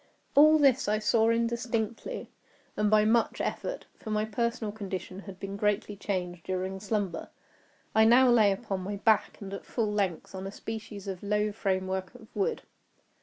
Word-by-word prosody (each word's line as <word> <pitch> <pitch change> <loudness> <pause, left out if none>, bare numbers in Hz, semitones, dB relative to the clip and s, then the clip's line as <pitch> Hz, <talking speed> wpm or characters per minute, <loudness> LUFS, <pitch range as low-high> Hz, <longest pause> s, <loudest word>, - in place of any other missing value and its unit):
All 305 +2 +7
this 275 -5 +4
I 210 +1 +2
saw 220 +1 +3
indistinctly 230 - -2 0.4
and 210 0 +2
by 215 0 +5
much 230 +2 +2
effort—for - - -5
my 215 0 +1
personal 225 0 -2
condition 195 -3 -6
had 195 -2 -10
been 195 0 -5
greatly 210 0 0
changed 180 -4 -3
during 185 +1 -3
slumber. 200 -4 -2 0.6
I 220 0 +6
now 250 +3 +7
lay 215 -4 +5
upon 195 -1 -3
my 195 +2 -4
back, 215 +2 +2
and 195 -1 -7
at 195 - -6
full 220 -4 -1
length, 195 -5 -1
on 190 0 -5
a - - -6
species 210 -2 -7
of 190 -2 -4
low 210 +1 0
framework 190 -1 -2
of 225 -3 -15
wood. 460 +4 -1
210 Hz, 165 wpm, -29 LUFS, 195-225 Hz, 0.6 s, All